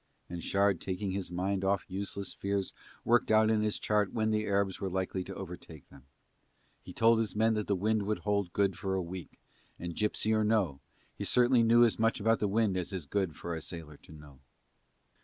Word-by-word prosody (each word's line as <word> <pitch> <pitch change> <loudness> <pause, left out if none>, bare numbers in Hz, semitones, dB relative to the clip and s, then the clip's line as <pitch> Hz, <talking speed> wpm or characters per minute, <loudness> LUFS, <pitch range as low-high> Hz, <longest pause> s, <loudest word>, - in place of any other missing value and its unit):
and 85 -1 -5
Shard 100 -2 +2
taking 95 +1 -3
his 95 -2 -3
mind 95 +2 -2
off 95 -1 +1
useless 100 0 -4
fears 100 -1 -2 0.3
worked 120 +1 +3
out 110 0 +5
on 110 -1 +2
his 105 -1 0
chart 105 -2 +1
when 110 -1 0
the 110 0 0
Arabs 100 -1 0
were 95 - -1
likely 95 0 -2
to 95 - -8
overtake 90 -5 -9
them. 70 -1 -17 0.7
He - - -11
told 115 0 +4
his 110 -2 -2
men 110 +1 +3
that 105 -1 -2
the 100 - +2
wind 110 +3 +1
would 105 - 0
hold 100 -3 0
good 100 -1 +1
for 95 +1 -2
a 95 - 0
week, 90 0 -8 0.4
and, 85 -1 -6
gipsy 105 0 0
or 110 0 +2
no, 105 -10 +1 0.3
he - - -6
certainly 125 0 +4
knew 115 +1 +6
as 115 - 0
much 115 0 +2
about 115 +2 +2
the 105 - +1
wind 100 -2 +1
as 90 +2 -3
is 95 -6 -4
good 95 0 -1
for 85 +1 -5
a 80 - -4
sailor 80 -3 -8
to - - -18
know. 75 -3 -14
100 Hz, 215 wpm, -31 LUFS, 90-110 Hz, 0.7 s, knew